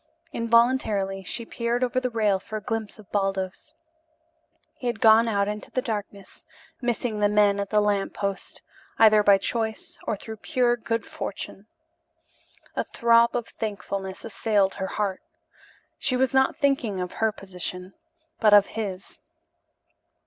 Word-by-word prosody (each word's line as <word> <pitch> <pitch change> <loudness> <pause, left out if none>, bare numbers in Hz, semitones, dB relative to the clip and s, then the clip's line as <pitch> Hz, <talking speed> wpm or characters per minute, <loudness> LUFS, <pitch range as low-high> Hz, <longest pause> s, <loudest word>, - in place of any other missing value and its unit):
Involuntarily 230 -5 +2
she 230 +5 -5
peered 235 +2 -1
over 255 0 +1
the 255 0 -2
rail 215 -4 +1
for 215 +3 -6
a 210 - -8
glimpse 225 -2 -4
of 215 -3 -16
Baldos. 195 -2 -2 1.0
He 250 - -4
had 235 -2 -2
gone 225 +1 +6
out 200 -2 +1
into 210 0 -5
the - - -1
darkness, 205 -3 -6 0.4
missing 240 -2 -1
the 205 0 +3
men 205 -1 +3
at 200 -1 -3
the 210 -1 +3
lamp 205 -1 0
post 200 -1 -4 0.3
either 215 -1 +6
by 200 -1 +6
choice 230 - -3
or 220 - 0
through 220 +2 -8
pure 240 +2 +1
good 230 -1 -3
fortune. 200 +1 -7 1.1
A - - 0
throb 235 0 +3
of 240 -2 -2
thankfulness 200 -3 -5
assailed 205 -3 +1
her 190 - -4
heart. 200 -2 -2 0.8
She 255 - +1
was 260 0 +1
not 265 0 +3
thinking 270 -9 +1
of 180 -1 -3
her 220 -1 +1
position, 185 -1 -7 0.5
but 210 -2 +6
of 205 -1 +7
his. 195 -4 -5
215 Hz, 150 wpm, -25 LUFS, 200-235 Hz, 1.1 s, of